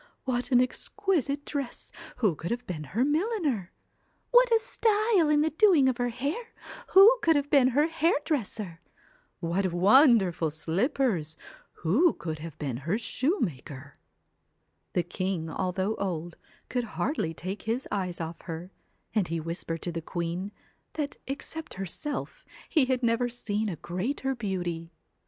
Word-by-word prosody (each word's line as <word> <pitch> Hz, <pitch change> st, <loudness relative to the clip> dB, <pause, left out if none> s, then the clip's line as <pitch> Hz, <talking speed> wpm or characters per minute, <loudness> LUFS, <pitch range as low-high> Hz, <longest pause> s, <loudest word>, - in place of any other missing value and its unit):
what 250 Hz, 0 st, -1 dB
an 245 Hz, -, +6 dB
exquisite 285 Hz, -, 0 dB
dress 280 Hz, -4 st, -4 dB, 0.2 s
who 215 Hz, -8 st, +2 dB
could 165 Hz, +3 st, -6 dB
have 245 Hz, +1 st, -3 dB
been 155 Hz, -4 st, -5 dB
her 230 Hz, -, 0 dB
milliner? 300 Hz, -, 0 dB, 0.6 s
What -, -, +6 dB
a 455 Hz, -, +7 dB
style 430 Hz, -6 st, +2 dB
in 300 Hz, 0 st, +4 dB
the 315 Hz, +1 st, +1 dB
doing 320 Hz, -5 st, +5 dB
of 255 Hz, -2 st, +1 dB
her 245 Hz, -1 st, 0 dB
hair 285 Hz, -, -4 dB, 0.4 s
who 430 Hz, +6 st, +9 dB
could 325 Hz, -1 st, +4 dB
have 285 Hz, 0 st, 0 dB
been 275 Hz, -3 st, +6 dB
her 280 Hz, +4 st, +3 dB
hairdresser? 290 Hz, -, -1 dB, 0.6 s
What 180 Hz, +2 st, 0 dB
wonderful 190 Hz, -, +5 dB
slippers, 170 Hz, -, 0 dB, 0.4 s
who 255 Hz, -, +3 dB
could 160 Hz, -2 st, -5 dB
have 160 Hz, -1 st, -8 dB
been 135 Hz, -5 st, -3 dB
her 165 Hz, -, -1 dB
shoemaker?' 155 Hz, -, -3 dB, 0.9 s
The 175 Hz, -, +2 dB
king, 175 Hz, -2 st, -3 dB
although 190 Hz, +3 st, -1 dB
old, 175 Hz, -3 st, -3 dB, 0.3 s
could 250 Hz, -1 st, -1 dB
hardly 165 Hz, -, -1 dB
take 185 Hz, +5 st, -5 dB
his 235 Hz, +4 st, -2 dB
eyes 185 Hz, -4 st, -2 dB
off 165 Hz, 0 st, -5 dB
her, 170 Hz, +2 st, -7 dB, 0.4 s
and 210 Hz, -5 st, +1 dB
he 165 Hz, 0 st, -2 dB
whispered 165 Hz, 0 st, -4 dB
to 175 Hz, -, -2 dB
the 165 Hz, 0 st, -4 dB
queen, 175 Hz, +4 st, -3 dB, 0.4 s
that 295 Hz, -2 st, -3 dB
except 280 Hz, +4 st, -6 dB
herself, 290 Hz, -, -4 dB, 0.2 s
he 305 Hz, -5 st, +3 dB
had 255 Hz, -1 st, 0 dB
never 235 Hz, +1 st, +2 dB
seen 220 Hz, -3 st, -2 dB
a 180 Hz, -, -3 dB
greater 235 Hz, -, -2 dB
beauty. 175 Hz, -7 st, -3 dB
225 Hz, 145 wpm, -28 LUFS, 175-285 Hz, 0.9 s, who